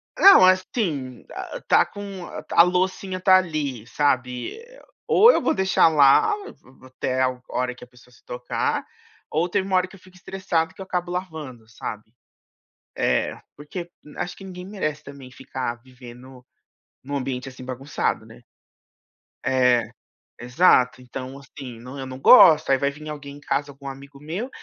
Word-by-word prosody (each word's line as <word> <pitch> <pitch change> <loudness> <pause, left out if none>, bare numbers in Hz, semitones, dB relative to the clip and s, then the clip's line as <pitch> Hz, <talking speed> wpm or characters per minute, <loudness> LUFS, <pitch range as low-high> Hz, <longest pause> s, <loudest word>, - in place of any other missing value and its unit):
Não, 390 - +8
assim, 185 - 0
a - - -7
a - - -3
está - - +3
com 200 -3 -8
a - - -8
a 170 - +7
loucinha 185 +1 -1
está 185 0 +6
ali, 145 -10 -3
sabe, 130 - -1
eh, 485 +2 -15 0.3
ou 465 +3 +7
eu - - +1
vou - - +1
deixar 190 -3 +3
lá, 145 - +5
v 410 0 -10
v 130 0 -19
até 130 0 -2
a 130 -1 0
hora 125 0 -2
que - - -14
a - - -12
pessoa 125 0 -21
se - - -23
tocar, 125 0 -2 0.5
ou 160 +3 0
teve 195 0 -1
uma 190 - 0
hora 185 0 +2
que 195 - -15
eu - - -16
fico 185 0 -20
estressado 180 -4 -2
que - - -12
eu - - -6
acabo 180 -1 -3
lavando, 155 -11 -6
sabe. 110 0 -8 0.8
É, - - 0 0.2
porque 170 +4 -8 0.3
acho 175 - -4
que 195 - -12
ninguém 180 -1 -9
merece 155 -7 -4
também 140 -2 -11
ficar 125 -2 -5
vivendo, 125 0 -14 0.6
em 140 - -10
um - - -1
ambiente 130 -1 -4
assim 130 0 -12
bagunçado, 130 +3 -3
né - - -15 1.0
É, 125 -2 +3 0.5
exato, 125 -1 +3
então 130 +1 -8
assim, 130 -4 -11
não, 125 +4 -10
eu 135 - -5
não 130 0 -8
gosto, 155 - +7
aí 135 - +5
vai 140 +1 0
vim 150 +2 -11
alguém 145 -1 -8
em - - -13
casa, 145 0 -2
algum 140 0 -12
amigo 140 +1 -10
meu, 175 - -5
145 Hz, 180 wpm, -23 LUFS, 130-180 Hz, 1.0 s, Não